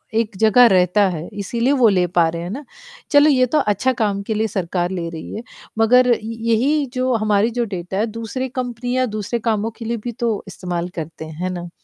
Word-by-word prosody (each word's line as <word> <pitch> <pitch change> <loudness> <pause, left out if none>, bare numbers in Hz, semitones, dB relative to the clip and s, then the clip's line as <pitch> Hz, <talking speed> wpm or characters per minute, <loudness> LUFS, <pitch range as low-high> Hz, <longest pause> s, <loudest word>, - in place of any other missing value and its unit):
एक 220 -3 0
जगह 220 +4 +6
रहता 185 +1 +3
है, 165 -1 -5
इसीलिए 230 +6 -1
वो 235 - +6
ले 180 -2 +2
पा 170 -1 +3
रहे 170 0 -5
हैं 175 - -5
ना? 275 +8 -6 0.5
चलो 290 +1 +6
ये 255 -3 +4
तो 300 +5 +1
अच्छा 255 +3 +1
काम 200 -2 0
के 220 - 0
लिए 220 +1 0
सरकार 180 -2 -2
ले 175 -3 -3
रही 160 -1 -8
है, 225 - -6 0.4
मगर 250 +3 +5
इ 235 - +2 0.3
यही 280 +6 +2
जो 255 0 0
हमारी 215 0 +2
जो - - +3
डेटा 180 +2 -5
है 215 - +2
दूसरे 230 +4 -4
कंपनियाँ 250 0 -2
दूसरे 215 +2 -3
कामों 220 -1 -1
के 230 - -8
लिए 235 +1 -2
भी 240 - -3
तो 230 -3 -1
इस्तेमाल 180 -2 -4
करते, 160 -1 -6
है 165 +4 -4
ना? 175 -1 -6
215 Hz, 215 wpm, -20 LUFS, 180-245 Hz, 0.5 s, जगह